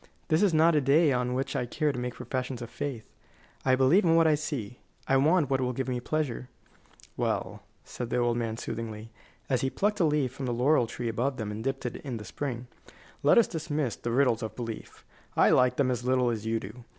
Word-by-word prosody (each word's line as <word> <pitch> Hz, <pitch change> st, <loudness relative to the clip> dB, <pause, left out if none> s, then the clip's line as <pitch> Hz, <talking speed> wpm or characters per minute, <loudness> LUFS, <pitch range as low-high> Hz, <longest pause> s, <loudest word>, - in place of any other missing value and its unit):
This 155 Hz, 0 st, +3 dB
is 205 Hz, -3 st, +4 dB
not 165 Hz, +1 st, +4 dB
a 150 Hz, -, +3 dB
day 145 Hz, +3 st, +4 dB
on 125 Hz, -1 st, 0 dB
which 135 Hz, +1 st, -2 dB
I 125 Hz, -, -1 dB
care 150 Hz, +4 st, 0 dB
to 125 Hz, -, -5 dB
make 125 Hz, -1 st, -4 dB
professions 125 Hz, -1 st, -4 dB
of 115 Hz, -, -9 dB
faith. 140 Hz, -6 st, -5 dB, 0.6 s
I 130 Hz, -1 st, +4 dB
believe 135 Hz, +10 st, +4 dB
in 165 Hz, -2 st, +4 dB
what 165 Hz, 0 st, +5 dB
I 155 Hz, -, +5 dB
see. 145 Hz, -7 st, -4 dB, 0.3 s
I 135 Hz, -, +3 dB
want 155 Hz, +3 st, +3 dB
what 135 Hz, -1 st, +2 dB
will 125 Hz, 0 st, 0 dB
give 130 Hz, +2 st, -3 dB
me 125 Hz, -1 st, -1 dB
pleasure." 130 Hz, -2 st, -2 dB, 0.7 s
"Well," -, -, -2 dB, 0.2 s
said 120 Hz, -2 st, -6 dB
the -, -, 0 dB
old 120 Hz, -1 st, +2 dB
man, 115 Hz, -2 st, -2 dB
soothingly, 110 Hz, -1 st, -6 dB, 0.4 s
as 130 Hz, -3 st, +1 dB
he 135 Hz, -, +1 dB
plucked 205 Hz, +8 st, 0 dB
a 170 Hz, -, +4 dB
leaf 150 Hz, -5 st, +1 dB
from 130 Hz, -1 st, -5 dB
the 120 Hz, -, -1 dB
laurel 125 Hz, 0 st, +3 dB
tree 120 Hz, +1 st, -5 dB
above 125 Hz, +4 st, -1 dB
them 105 Hz, -2 st, -4 dB
and 110 Hz, +2 st, -5 dB
dipped 135 Hz, 0 st, -3 dB
it 125 Hz, -, -3 dB
in 130 Hz, -4 st, -5 dB
the 105 Hz, -, -8 dB
spring, 125 Hz, -2 st, -4 dB, 0.6 s
"let 145 Hz, -, +5 dB
us 235 Hz, -, +7 dB
dismiss 150 Hz, -6 st, -2 dB
the 120 Hz, -, -5 dB
riddles 125 Hz, -1 st, +2 dB
of 110 Hz, -, -5 dB
belief. 115 Hz, -3 st, -7 dB, 0.3 s
I -, -, +5 dB
like 125 Hz, -1 st, +4 dB
them 130 Hz, -2 st, +2 dB
as 120 Hz, -1 st, -2 dB
little 125 Hz, -1 st, +2 dB
as 110 Hz, -1 st, -4 dB
you 115 Hz, 0 st, +1 dB
do. 110 Hz, +4 st, -10 dB
130 Hz, 230 wpm, -28 LUFS, 120-145 Hz, 0.7 s, us